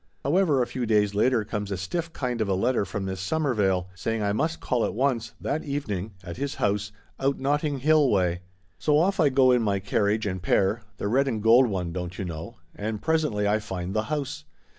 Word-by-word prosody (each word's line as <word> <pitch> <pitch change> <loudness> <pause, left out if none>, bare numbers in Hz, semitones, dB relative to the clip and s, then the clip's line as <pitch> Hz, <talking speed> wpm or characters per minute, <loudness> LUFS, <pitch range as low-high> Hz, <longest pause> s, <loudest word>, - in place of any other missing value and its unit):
However, 150 -4 +3
a - - -1
few 125 -1 -4
days 105 -2 +3
later 115 +1 +2
comes 105 -1 -4
a 95 - -2
stiff 165 - -3
kind 125 -6 -3
of 105 - 0
a 95 - +2
letter 115 +2 +1
from 95 +1 -4
this 95 -1 -4
Waklyn, 105 - +1
saying 110 +4 -2
I 100 0 +1
must 160 +8 -1
call 125 -2 0
at - - -2
once, 125 -2 0
that 155 - -2
evening, 110 -9 -3
at 85 -1 -7
his 140 -1 -3
house, 105 0 0 0.3
out 135 +1 +1
Notting 145 0 0
Hill 155 -1 +4
way. 90 -4 +1 0.4
So 150 -1 +3
off 190 +5 +2
I 155 -4 +5
go, 130 -1 +4
in 125 -1 +4
my 100 -3 +1
carriage 105 +2 0
and 95 -2 -3
pair 100 +5 +2 0.2
(the - - -2
red 135 +6 +2
and 115 -5 -1
gold 120 +3 +6
one, 90 -5 -3
don't 90 0 -5
you 95 - -3
know), 80 -2 -7 0.2
and 105 +1 -4
presently 150 -10 +1
I 105 +1 +2
find 95 -3 -5
the 110 +1 0
house. 140 - -3
110 Hz, 215 wpm, -26 LUFS, 100-140 Hz, 0.4 s, gold